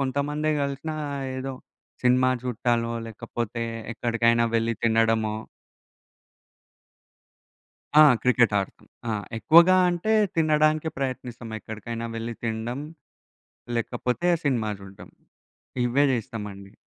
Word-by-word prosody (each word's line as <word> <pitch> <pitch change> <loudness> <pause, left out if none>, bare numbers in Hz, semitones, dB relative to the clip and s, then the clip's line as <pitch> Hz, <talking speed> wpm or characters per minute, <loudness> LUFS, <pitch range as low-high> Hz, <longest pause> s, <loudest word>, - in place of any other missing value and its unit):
కొంతమందే 145 +3 -1
గలిసినా, 140 +3 -3 0.4
ఏదో 135 +1 -4 0.5
సినిమా 130 +1 +4
జూడటాలో, 120 -1 0
లేకపోతే 115 +1 -5 0.3
ఎక్కడికైనా 115 0 +2
వెళ్ళి 115 0 +1
తినడమో 110 -1 +2 2.6
ఆ! 155 - +10 0.2
క్రికెట్టాడతం. 115 -6 +2 0.2
ఆ! - - 0 0.3
ఎక్కువగా 170 +8 +6
అంటే, 175 +6 0 0.2
తినడానికే 155 0 +2
ప్రయత్నిస్తాం. 125 -3 -4
ఎక్కడికైనా 115 +2 -6
వెళ్లి 115 +1 -4
తిండం, 115 +3 -3 1.0
లేకపోతే 125 +7 -1 0.2
సినిమా 115 -6 +1
జూడడం. 95 0 -12 0.7
ఇవే 135 +4 +3
జేస్తామండి. 105 -5 -5
120 Hz, 85 wpm, -25 LUFS, 115-140 Hz, 2.6 s, ఆ